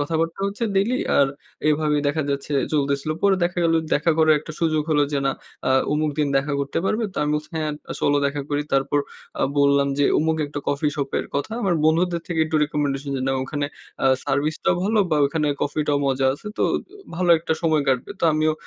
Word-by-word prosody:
কথাবার্তা 165 Hz, +4 st, -1 dB
হচ্ছে 205 Hz, +4 st, -3 dB
ডেইলি 225 Hz, +6 st, +2 dB, 0.2 s
আর 140 Hz, -, +5 dB, 0.4 s
এভাবেই 150 Hz, -1 st, +2 dB
দেখা 155 Hz, +2 st, 0 dB
যাচ্ছে 140 Hz, +1 st, -3 dB, 0.2 s
চলতেছিল। 140 Hz, 0 st, 0 dB
পরে 200 Hz, -1 st, +4 dB
দেখা 180 Hz, +1 st, -2 dB
গেল 165 Hz, -, +3 dB, 0.2 s
দেখা 150 Hz, +3 st, +2 dB
করার 155 Hz, -1 st, +5 dB
একটা 155 Hz, -, -9 dB
সুযোগ 155 Hz, -2 st, +2 dB
হলো 145 Hz, -1 st, +4 dB
যে 140 Hz, -, +1 dB
না 135 Hz, -, +3 dB, 0.4 s
আ -, -, +2 dB, 0.2 s
অমুক 150 Hz, 0 st, +1 dB
দিন 145 Hz, -1 st, +2 dB
দেখা 140 Hz, +2 st, 0 dB
করতে 140 Hz, 0 st, -2 dB
পারবে। 220 Hz, +4 st, 0 dB
তো -, -, -23 dB
আমি 150 Hz, -, 0 dB
বলছি 150 Hz, 0 st, -4 dB
হ্যাঁ, 155 Hz, -1 st, -1 dB, 0.2 s
আ -, -, -1 dB
চলো 145 Hz, -, +3 dB
দেখা 140 Hz, +1 st, -2 dB
করি। 145 Hz, 0 st, 0 dB
তারপর 135 Hz, +1 st, +2 dB, 0.4 s
আ -, -, +2 dB, 0.2 s
বললাম 140 Hz, 0 st, +4 dB
যে 145 Hz, -, +3 dB
অমুক 160 Hz, +1 st, +1 dB
একটা 145 Hz, 0 st, -6 dB
কফি 145 Hz, +2 st, +1 dB
শপ 140 Hz, -2 st, -2 dB
এর -, -, -4 dB
কথা। 145 Hz, +10 st, -2 dB
আমার 185 Hz, -3 st, +2 dB
বন্ধুদের 170 Hz, +2 st, +2 dB
থেকে 165 Hz, -2 st, -1 dB
একটু 155 Hz, 0 st, -1 dB
রিকমেন্ডেশন 145 Hz, -1 st, -2 dB
যে -, -, -3 dB
নেয়া 135 Hz, 0 st, 0 dB
ওখানে 145 Hz, +1 st, -2 dB, 0.4 s
আ -, -, +5 dB, 0.2 s
সার্ভিস 145 Hz, +3 st, 0 dB
টাও -, -, +4 dB
ভালো 215 Hz, +2 st, +1 dB
বা 155 Hz, -, +3 dB
ওখানে 150 Hz, +1 st, -1 dB, 0.2 s
কফিটাও 145 Hz, 0 st, 0 dB
মজা 135 Hz, 0 st, +1 dB
আছে। 210 Hz, -, -14 dB
তো -, -, 0 dB
অ -, -, 0 dB, 0.4 s
ভালো 175 Hz, 0 st, +1 dB
একটা 160 Hz, 0 st, -2 dB
সময় 155 Hz, -2 st, +2 dB
কাটবে। 130 Hz, -2 st, 0 dB
তো -, -, +1 dB
আমিও 155 Hz, +1 st, +2 dB
150 Hz, 215 wpm, -23 LUFS, 140-160 Hz, 0.4 s, আর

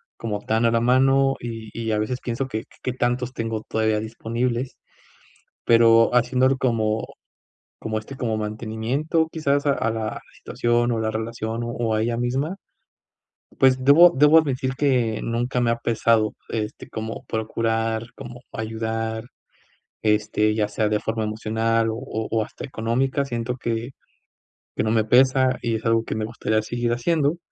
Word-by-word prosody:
como 105 Hz, -3 st, -4 dB
tan 110 Hz, +2 st, +1 dB
a 115 Hz, -, +4 dB
la 115 Hz, -, +2 dB
mano, 135 Hz, +3 st, +3 dB
y 115 Hz, -2 st, -7 dB
y 115 Hz, -1 st, -3 dB
a 105 Hz, -, +1 dB
veces 125 Hz, +4 st, -2 dB
pienso 125 Hz, +2 st, -3 dB
que 110 Hz, -2 st, -4 dB, 0.2 s
qué 130 Hz, -, -1 dB
tantos 125 Hz, 0 st, -1 dB
tengo 115 Hz, -2 st, -3 dB
todavía 110 Hz, -1 st, +1 dB
disponibles. 120 Hz, +3 st, -3 dB, 0.9 s
Pero 115 Hz, 0 st, +5 dB
haciéndolo 130 Hz, +2 st, +3 dB
como 110 Hz, -4 st, 0 dB, 0.7 s
como, 110 Hz, -1 st, -2 dB
este, 125 Hz, +6 st, -10 dB
como 115 Hz, -4 st, -1 dB
mantenimiento, 115 Hz, +9 st, -1 dB
quizás 145 Hz, -2 st, 0 dB
a 140 Hz, -, +4 dB
a 115 Hz, -, -1 dB
la 110 Hz, -1 st, -4 dB
situación, 120 Hz, 0 st, 0 dB
o 115 Hz, -, 0 dB
la 110 Hz, 0 st, -1 dB
relación, 110 Hz, +1 st, -3 dB
o -, -, -4 dB
o 115 Hz, -2 st, -1 dB
a 110 Hz, -, +1 dB
ella 115 Hz, +1 st, -1 dB
misma. 130 Hz, +8 st, -1 dB, 1.0 s
Pues 130 Hz, -1 st, +4 dB
debo 160 Hz, +6 st, +8 dB
debo 150 Hz, +1 st, +5 dB
admitir 135 Hz, -4 st, 0 dB
que 125 Hz, -6 st, +1 dB
nunca 120 Hz, +2 st, -1 dB
me 115 Hz, -, +2 dB
ha 115 Hz, -, +1 dB
pesado, 115 Hz, -1 st, +1 dB, 0.2 s
este, 110 Hz, -1 st, -4 dB
como 110 Hz, 0 st, -5 dB
procurar, 115 Hz, +1 st, -2 dB
como 120 Hz, 0 st, -10 dB
ayudar, 110 Hz, 0 st, -3 dB, 0.8 s
este, 105 Hz, 0 st, +2 dB
ya 105 Hz, -1 st, +1 dB
sea 105 Hz, 0 st, -1 dB
de 105 Hz, 0 st, +1 dB
forma 110 Hz, +1 st, -2 dB
emocional, 110 Hz, +1 st, 0 dB
o 110 Hz, -, -4 dB, 0.3 s
o 110 Hz, -1 st, +1 dB
hasta -, -, -9 dB
económica. 130 Hz, +3 st, -1 dB
Siento 120 Hz, -1 st, -3 dB
que 115 Hz, +1 st, -3 dB, 0.8 s
que -, -, 0 dB
no 110 Hz, -, 0 dB
me 110 Hz, -1 st, +3 dB
pesa, 130 Hz, +2 st, +4 dB
y 115 Hz, -1 st, -1 dB
es 110 Hz, -, -5 dB
algo 115 Hz, 0 st, +3 dB
que -, -, -3 dB
me 110 Hz, 0 st, -2 dB
gustaría 110 Hz, -1 st, -1 dB
seguir 120 Hz, +2 st, -2 dB
haciendo 150 Hz, +5 st, +1 dB
115 Hz, 160 wpm, -23 LUFS, 110-125 Hz, 1.0 s, debo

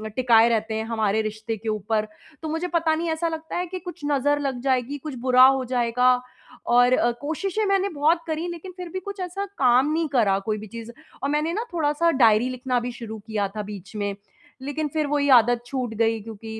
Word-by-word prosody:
टिकाए 235 Hz, -2 st, +5 dB
रहते 220 Hz, -1 st, 0 dB
हैं 220 Hz, -, -2 dB
हमारे 220 Hz, -2 st, 0 dB
रिश्ते 220 Hz, +1 st, -4 dB
के 220 Hz, +2 st, -5 dB
ऊपर। 215 Hz, +1 st, -1 dB, 0.3 s
तो 315 Hz, -, -4 dB
मुझे 325 Hz, +3 st, -2 dB
पता 330 Hz, -2 st, +1 dB
नहीं 330 Hz, +1 st, -2 dB
ऐसा 320 Hz, +1 st, -1 dB
लगता 320 Hz, -1 st, -5 dB
है 360 Hz, +1 st, -2 dB
कि 370 Hz, +2 st, -6 dB
कुछ 355 Hz, -1 st, -9 dB
नज़र 290 Hz, +1 st, +2 dB
लग 270 Hz, -3 st, -2 dB
जाएगी, 260 Hz, +1 st, 0 dB
कुछ 290 Hz, 0 st, -7 dB
बुरा 255 Hz, 0 st, +6 dB
हो 265 Hz, -1 st, +3 dB
जाएगा 250 Hz, 0 st, +2 dB, 0.5 s
और 245 Hz, +1 st, +4 dB
अ, 240 Hz, -1 st, +3 dB
कोशिशें 385 Hz, +8 st, -2 dB
मैंने 395 Hz, 0 st, +1 dB
बहुत 320 Hz, +2 st, +2 dB
करी 320 Hz, +2 st, -2 dB
लेकिन 345 Hz, +2 st, -8 dB
फिर 360 Hz, -1 st, -6 dB
भी 375 Hz, -, -4 dB
कुछ 400 Hz, +2 st, -8 dB
ऐसा 370 Hz, +2 st, -3 dB
काम 255 Hz, +3 st, +4 dB
नहीं 325 Hz, 0 st, 0 dB
करा 195 Hz, -4 st, +3 dB
कोई 215 Hz, -, 0 dB
भी 215 Hz, +1 st, -8 dB
चीज़ 230 Hz, +2 st, -8 dB, 0.3 s
और 275 Hz, -, 0 dB
मैंने 300 Hz, +3 st, 0 dB
ना 440 Hz, +5 st, -2 dB
थोड़ा-सा 325 Hz, +1 st, +2 dB
डायरी 235 Hz, -3 st, +4 dB
लिखना 255 Hz, 0 st, -1 dB
भी 245 Hz, +1 st, -4 dB
शुरू 225 Hz, -2 st, -8 dB
किया 210 Hz, -2 st, -1 dB
था -, -, -1 dB
बीच 205 Hz, 0 st, -9 dB
में। 205 Hz, -1 st, -2 dB, 0.5 s
लेकिन 290 Hz, +3 st, -3 dB
फिर 310 Hz, -2 st, 0 dB
वो 295 Hz, +1 st, 0 dB
ही 285 Hz, 0 st, +1 dB
आदत 240 Hz, -1 st, +5 dB
छूट 250 Hz, -2 st, -3 dB
गई 225 Hz, 0 st, +1 dB
क्योंकि 220 Hz, +1 st, -8 dB
255 Hz, 215 wpm, -24 LUFS, 225-320 Hz, 0.5 s, बुरा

